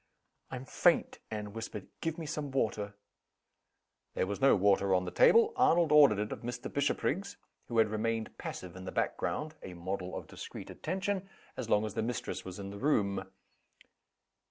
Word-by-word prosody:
"I'm 130 0 -6
faint!" - - +2
Anne 105 -2 -5
whispered. 110 -3 -6 0.2
"Give 165 0 -2
me 165 - -5
some 150 -1 -3
water." 105 -6 -1 1.2
There - - +1
was 100 +4 -4
no 135 - +6
water 100 -1 +3
on 90 0 +1
the 90 - -4
table. 460 0 +6
Arnold 165 -2 +4
ordered 145 -8 +7
it 105 +1 -2
of - - -4
Mr. 120 +1 -5
Bishopriggs 195 +7 0 0.3
who 120 - -3
had 110 -1 +6
remained 110 +1 -1
passive 90 -1 -6
in 95 0 -8
the - - -4
back - - 0
ground 155 +1 -2
(a 90 - -8
model 90 +1 -4
of - - -6
discreet - - -8
attention) 190 +2 -2 0.3
as - - -5
long 105 +1 +3
as 105 - -4
the 110 - -1
mistress 120 +1 -3
was 95 -1 -7
in 100 -1 -6
the 100 - -8
room. 100 -9 +1
110 Hz, 180 wpm, -32 LUFS, 100-150 Hz, 1.2 s, ordered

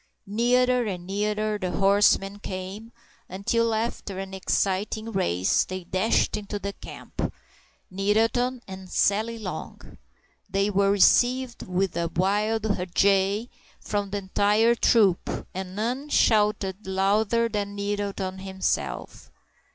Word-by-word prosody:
Nearer 245 +4 +2
and 180 -3 -5
nearer 210 +2 -1
the 185 -2 -2
horsemen 200 +1 +3
came, 195 +4 -7 0.4
until, 230 +5 0
after 220 -3 -3
an 190 0 -6
exciting 200 +3 -1
race, 95 - +1
they 185 0 -6
dashed 185 +5 +1
into 205 0 -4
the 200 0 -5
camp—Nettleton 225 +10 -3
and 190 -1 -9
Sally 220 +5 +1
Long! 185 -7 -8 0.5
They 195 +1 +1
were 200 0 +3
received 245 +6 +3
with 185 0 -1
a 170 0 0
wild 210 +5 +1
huzza 195 +2 +1 0.3
from 205 -1 -2
the 205 - -2
entire 205 +4 +2
troop, 210 -6 +2
and 185 0 -6
none 250 +7 -2
shouted 210 -5 +2
louder 205 +4 +2
than 205 -2 -3
Nettleton 200 -2 -3
himself. 190 0 -3
200 Hz, 110 wpm, -25 LUFS, 190-220 Hz, 0.5 s, horsemen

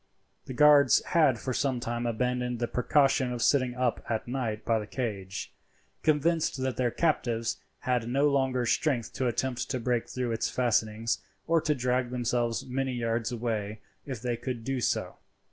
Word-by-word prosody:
The 130 - -6
guards 145 -3 +6
had 150 -7 +3
for 130 +3 -3
some 130 -1 0
time 120 0 -2
abandoned 125 +1 -1
the 120 0 -1
precaution 135 0 +2
of 120 -1 -2
sitting 130 -3 +2
up 125 -2 0
at 110 0 -2
night 120 -4 -3
by 115 -1 +2
the 105 - -6
cage, 100 -6 -4 0.5
convinced 155 -1 +1
that 130 -2 -1
their 125 0 +1
captives 120 -6 0 0.2
had 125 -2 0
no 140 +4 +3
longer 130 -3 +1
strength 125 -1 0
to 130 - -1
attempt 125 +1 -2
to 130 - -1
break 120 -1 -1
through 125 -2 -2
its 115 - -1
fastenings 115 -2 0 0.3
or 165 -1 +3
to 150 -1 +1
drag 125 -1 0
themselves 120 -1 -1
many 130 0 -2
yards 115 0 -1
away 110 -3 -3 0.2
if 130 -5 -5
they 120 -1 0
could 120 -1 -5
do 135 +2 -2
so. - - -1
125 Hz, 170 wpm, -28 LUFS, 115-130 Hz, 0.5 s, guards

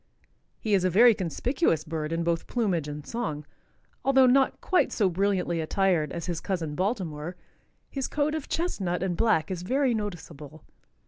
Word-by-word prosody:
He 215 - -1
is 190 -2 +3
a 185 - +3
very 230 +6 +7
conspicuous 190 - 0
bird 155 -1 -4
in 165 0 -1
both 170 -1 -1
plumage 190 - 0
and 150 0 -7
song. 155 -11 -4 0.6
Although 265 0 +5
not 265 +1 +3
quite 370 - +2
so 200 -4 +2
brilliantly 180 -2 0
attired 175 -1 +1
as 170 - -5
his 175 -2 -3
cousin 170 -6 -3
Baltimore, 180 -4 -2 0.5
his 270 -2 -3
coat 300 +1 0
of 315 -3 -4
chestnut 190 - -1
and 185 -2 -1
black 195 -6 +2
is 180 -2 -3
very 260 +6 +1
noticeable. 160 -8 -6
185 Hz, 165 wpm, -27 LUFS, 165-235 Hz, 0.6 s, very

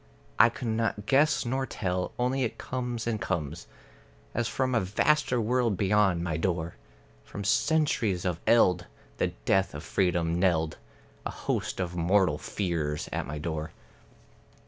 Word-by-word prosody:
I 120 - +8
cannot 115 -3 -2
guess 145 +3 +3
nor 130 +2 -1
tell; 90 -2 -2
only 125 +2 0
it 120 - -1
comes 125 -2 -4
and 110 -3 -1
comes, 85 -4 -3 0.7
As 120 -1 0
from 130 +2 -1
a 115 - +4
vaster 125 +7 +2
world 115 -2 +1
beyond 95 -3 +2
my 85 -3 -1
door, 85 -1 -1 0.5
From 100 - -7
centuries 115 - +1
of 90 -3 -1
eld, 90 -7 +4 0.3
the - - +2 0.2
death 95 -4 +2
of 75 - -6
freedom 85 -2 +1
knelled, 80 -4 +1 0.5
A - - -3
host - - -3
of 90 -1 -2
mortal 90 -2 +2
fears 80 -6 -2
at - - -2
my 75 - -5
door. 80 0 -4
95 Hz, 145 wpm, -28 LUFS, 85-120 Hz, 0.7 s, I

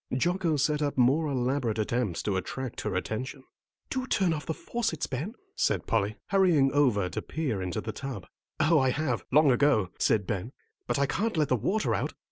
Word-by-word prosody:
Jocko 175 +1 +1
set 150 +2 +1
up 145 -2 -1
more 135 +6 +4
elaborate 130 -3 0
attempts 110 -4 -1
to 100 - 0
attract 125 +7 -4
her - - -2
attention. 130 +8 -3 0.5
"Do 260 -1 -2
turn 190 -8 +2
off 150 -2 -5
the 160 - 0
faucets, 225 -10 -2
Ben," 155 - -4 0.2
said - - +1
Polly, 105 -1 0
hurrying 175 -9 +4
over 125 -10 +3
to - - -4
peer 135 -11 -2
into 90 -2 -3
the 110 - -4
tub. 130 -6 -6 0.3
"Oh, 155 +1 +4
I 130 -1 +3
have, 130 -3 -1
long 145 +1 +6
ago," 120 -8 +3
said 105 -3 +2
Ben, 100 +6 -3 0.3
"but 120 - 0
I 140 - +3
can't 210 +7 -1
let 150 -3 +2
the 130 - +4
water 205 - 0
out." - - -2
135 Hz, 190 wpm, -28 LUFS, 115-155 Hz, 0.5 s, long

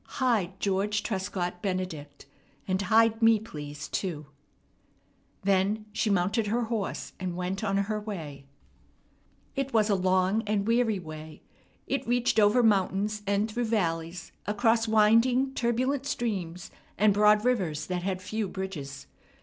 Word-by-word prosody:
Hide 210 -8 +1
George 200 +1 0
Trescott 185 -3 -3
Benedict. 175 -7 -4 0.4
And 190 0 0
hide 225 +2 +3
me, 225 0 +6
please, 150 -8 -8
too." 160 -6 -3 1.2
Then 200 +2 +1
she 215 +1 0
mounted 200 +3 +1
her 235 +3 0
horse, 225 -3 -3
and 185 -2 -3
went 180 +3 -3
on 195 -2 +1
her 210 +2 -1
way. 155 -10 -7 1.1
It 275 -2 -2
was 215 -1 +3
a - - +4
long 185 +3 +2
and 205 -1 0
weary 230 -2 +2
way. 155 -3 -9 0.4
It 275 -2 -2
reached 245 -1 +2
over 215 +4 +5
mountains 205 0 +1
and 200 +2 +1
through 240 +2 -1
valleys, 175 -5 -2 0.2
across 225 +2 +2
winding, 230 +5 +4
turbulent 255 +3 0
streams 185 -10 -3 0.3
and 210 0 +4
broad 210 +2 +4
rivers 180 -12 0
that 180 -1 -3
had 185 0 -3
few 215 +1 -2
bridges. 170 -8 -6
205 Hz, 135 wpm, -28 LUFS, 185-225 Hz, 1.2 s, me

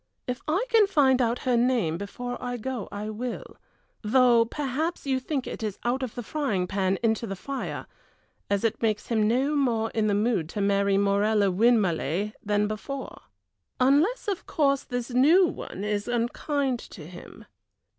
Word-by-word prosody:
If 250 -1 -4
I 365 +10 +1
can 445 -4 +5
find 270 -8 +3
out 235 0 +1
her 250 -1 +3
name 235 -9 +1
before 245 +5 -5
I 245 0 -3
go 245 -2 -4
I 210 +1 -5
will, 240 +3 -6 0.4
though 235 +1 +4
perhaps 295 +7 -3
you 265 -1 +1
think 265 0 -3
it - - -6
is 210 -3 -3
out 245 +3 0
of 255 -4 -4
the 245 - -5
frying 225 -11 -1
pan 190 0 0
into 225 0 +1
the 195 - -4
fire, 275 +8 -5 0.6
as 200 +1 0
it 225 - 0
makes 215 -2 -1
him 220 -3 +2
no 265 +6 +1
more 230 -6 +1
in 220 -1 0
the 205 - +2
mood 205 -6 0
to 205 - -5
marry 200 0 +2
Morella 200 0 +2
Winmarleigh 200 - +1
than 210 0 +1
before. 260 +6 -6 0.6
Unless, 295 - +3
of 395 -3 -3
course, 275 -3 +1
this 245 0 -4
new 305 +10 +5
one 200 - -5
is 210 -1 -2
unkind 245 +2 -1
to 160 -9 -11
him. 175 +2 -12
235 Hz, 170 wpm, -26 LUFS, 205-265 Hz, 0.6 s, can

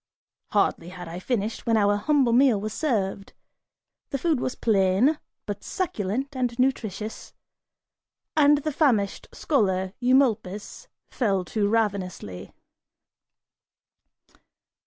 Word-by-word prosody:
(Hardly 170 - 0
had 180 -1 -9
I 170 +2 -6
finished, 220 +2 -3
when 225 -1 +3
our 205 -1 +3
humble 260 +2 +2
meal 250 -4 +5
was 215 +1 -4
served. 200 -9 -2 0.8
The 275 - -2
food 310 -1 +1
was 255 - -2
plain 215 +8 +2 0.3
but - - -5
succulent 270 - -3
and 245 -2 -1
nutritious, 225 -5 -2 1.0
and 295 -1 +5
the 310 - -1
famished 235 -10 +1
scholar 190 -9 0
Eumolpus, 245 - +1 0.2
fell 195 -7 0
to 210 -2 +2
ravenously.) 195 - -2
220 Hz, 105 wpm, -25 LUFS, 195-265 Hz, 1.0 s, meal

